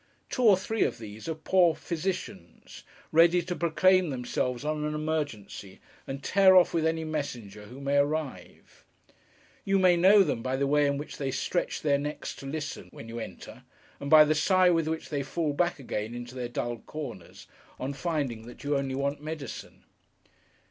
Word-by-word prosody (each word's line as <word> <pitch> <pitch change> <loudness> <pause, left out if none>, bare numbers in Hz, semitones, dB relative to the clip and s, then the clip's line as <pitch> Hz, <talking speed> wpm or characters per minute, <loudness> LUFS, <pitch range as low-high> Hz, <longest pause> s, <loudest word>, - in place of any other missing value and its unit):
Two - - -2
or 210 -6 +6
three 220 +4 -3
of - - -1
these 110 +4 -9
are 160 - -2
poor 170 +1 +3
physicians, 170 - -5 0.3
ready 170 +2 +5
to 180 +1 -4
proclaim 180 +1 +3
themselves 125 0 -2
on 155 0 -1
an 150 0 -2
emergency, 145 -11 -4 0.3
and 135 +1 -6
tear 190 -1 +5
off 180 - +6
with 160 -1 +2
any 160 0 -1
messenger 125 -10 -5
who 125 +5 -11
may 140 0 0
arrive. 145 0 -3 0.8
You 195 0 +2
may 185 -2 +5
know 195 +4 +6
them 115 - -2
by 130 +2 -2
the 140 +1 0
way 145 +1 +3
in 140 0 0
which 145 - -7
they 135 -2 -2
stretch 140 +6 -2
their 140 -2 +2
necks 150 +1 -5
to 135 - -8
listen, 155 +1 -5
when 115 - -11
you 115 +1 -5
enter; - - -9 0.4
and 140 - -5
by 155 0 +9
the 155 - +2
sigh 185 +4 +4
with 165 -2 +1
which 160 0 -3
they 145 -2 -1
fall 150 +2 -2
back 175 +4 0
again 115 -4 -4
into 120 0 -7
their 125 -2 -4
dull 120 -1 -3
corners, 150 +5 -8 0.3
on 135 +2 -3
finding 140 -8 -3
that 120 - -12
you 145 0 0
only 135 -1 -1
want 140 +1 -2
medicine. 155 -4 -7
150 Hz, 185 wpm, -28 LUFS, 130-170 Hz, 0.8 s, by